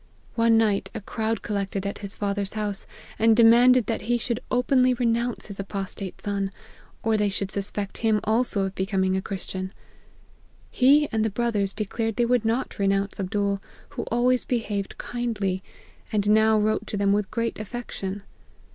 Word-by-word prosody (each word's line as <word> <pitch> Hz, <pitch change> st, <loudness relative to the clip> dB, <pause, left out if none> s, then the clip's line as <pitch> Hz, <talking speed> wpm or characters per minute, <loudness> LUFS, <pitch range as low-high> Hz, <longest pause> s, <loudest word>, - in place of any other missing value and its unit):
One 230 Hz, -1 st, +4 dB
night 210 Hz, -3 st, +2 dB
a -, -, -2 dB
crowd 220 Hz, +1 st, -2 dB
collected 200 Hz, -2 st, -2 dB
at 200 Hz, -, -3 dB
his 200 Hz, -2 st, -6 dB
father's 200 Hz, -1 st, -2 dB
house, 210 Hz, -2 st, -3 dB, 0.3 s
and 225 Hz, 0 st, +5 dB
de 235 Hz, -, +7 dB
manded 240 Hz, +1 st, +6 dB
that 225 Hz, -, -2 dB
he 240 Hz, -, +3 dB
should 235 Hz, 0 st, -2 dB
openly 255 Hz, 0 st, +3 dB
renounce 235 Hz, 0 st, 0 dB
his 200 Hz, -2 st, -6 dB
apostate 195 Hz, -1 st, -4 dB
son, 200 Hz, -1 st, -1 dB, 0.5 s
or 225 Hz, -1 st, +2 dB
they 210 Hz, -1 st, +2 dB
should 195 Hz, 0 st, -3 dB
suspect 200 Hz, 0 st, -4 dB
him 220 Hz, -2 st, +2 dB
also 220 Hz, -2 st, +3 dB
of 195 Hz, 0 st, -2 dB
becoming 190 Hz, -1 st, 0 dB
a 190 Hz, -, 0 dB
Christian. 190 Hz, -1 st, -5 dB, 1.0 s
He 285 Hz, +3 st, +5 dB
and 220 Hz, -2 st, +1 dB
the 220 Hz, -, +1 dB
brothers 210 Hz, -3 st, 0 dB
declared 225 Hz, +1 st, -2 dB
they 240 Hz, -, +2 dB
would 240 Hz, -1 st, +2 dB
not 230 Hz, +1 st, -1 dB
renounce 195 Hz, 0 st, 0 dB
Abdool, 200 Hz, 0 st, -1 dB, 0.3 s
who -, -, -5 dB
always 245 Hz, +1 st, +2 dB
behaved 210 Hz, -5 st, -2 dB
kindly, 210 Hz, -6 st, -2 dB, 0.5 s
and 205 Hz, -1 st, +2 dB
now 220 Hz, 0 st, +5 dB
wrote 215 Hz, +1 st, 0 dB
to 205 Hz, -, -3 dB
them 200 Hz, 0 st, +3 dB
with 205 Hz, -1 st, 0 dB
great 230 Hz, -1 st, -2 dB
affection. 205 Hz, -3 st, -5 dB
215 Hz, 165 wpm, -25 LUFS, 200-230 Hz, 1.0 s, de